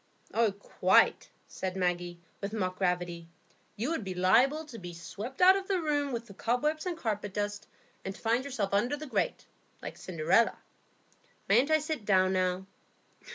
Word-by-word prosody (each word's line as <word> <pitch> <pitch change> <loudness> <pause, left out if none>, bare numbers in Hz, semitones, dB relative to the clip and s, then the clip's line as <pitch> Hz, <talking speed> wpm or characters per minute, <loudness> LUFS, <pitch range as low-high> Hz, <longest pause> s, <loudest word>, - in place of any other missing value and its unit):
"Oh, 225 -2 +3
quite," 200 +1 +2 0.2
said 185 -1 -4
Maggie, 175 -1 -1 0.2
with 200 +1 -4
mock 185 -4 -2
gravity. 175 -2 -1 0.5
"You 240 +9 -2
would 325 -9 -2
be 190 -1 -5
liable 245 - +3
to 235 -7 -10
be 175 -2 -8
swept 205 - -7
out 375 +1 +8
of 390 -1 -3
the 385 -2 +1
room 290 -3 0
with 235 -1 -3
the 205 - -12
cobwebs 300 - -1
and 350 -2 -2
carpet 210 - -3
dust, 205 0 -3 0.4
and 195 0 -5
to - - -14
find 235 +3 +1
yourself 225 -8 -3
under 240 +8 +1
the 305 - -7
grate, 270 - -1 0.3
like - - -8
Cinderella. 175 +6 +2 0.9
Mayn't 245 +8 +4
I 315 - +5
sit 310 -5 -3
down 190 -2 +3
now?" 185 0 0
210 Hz, 170 wpm, -30 LUFS, 185-275 Hz, 0.9 s, out